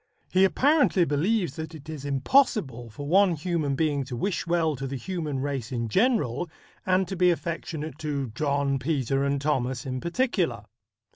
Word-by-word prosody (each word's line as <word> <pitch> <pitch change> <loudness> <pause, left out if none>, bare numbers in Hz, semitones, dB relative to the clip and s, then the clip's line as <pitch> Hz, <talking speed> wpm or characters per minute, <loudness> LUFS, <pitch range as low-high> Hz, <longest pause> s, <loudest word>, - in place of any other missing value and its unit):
He 190 +1 +5
apparently 255 - +3
believes 170 +3 0
that 160 +1 -6
it 155 0 -12
is 155 -3 -6
impossible 140 - +2
for 145 +6 -8
one 185 +1 +4
human 155 -3 -1
being 145 -2 +1
to 125 - -6
wish 180 +8 -2
well 165 -3 +1
to 135 +1 -4
the 135 - -4
human 150 -1 -3
race 135 -4 -3
in 115 -2 -2
general, 180 - +1 0.4
and 185 0 +3
to 195 - -4
be 180 0 +4
affectionate 160 -3 -3
to 145 -4 -2
John, 140 +1 0
Peter 135 -1 0
and 140 0 0
Thomas 130 -4 -1
in 130 -1 -3
particular. 245 +9 0
150 Hz, 165 wpm, -26 LUFS, 135-180 Hz, 0.4 s, He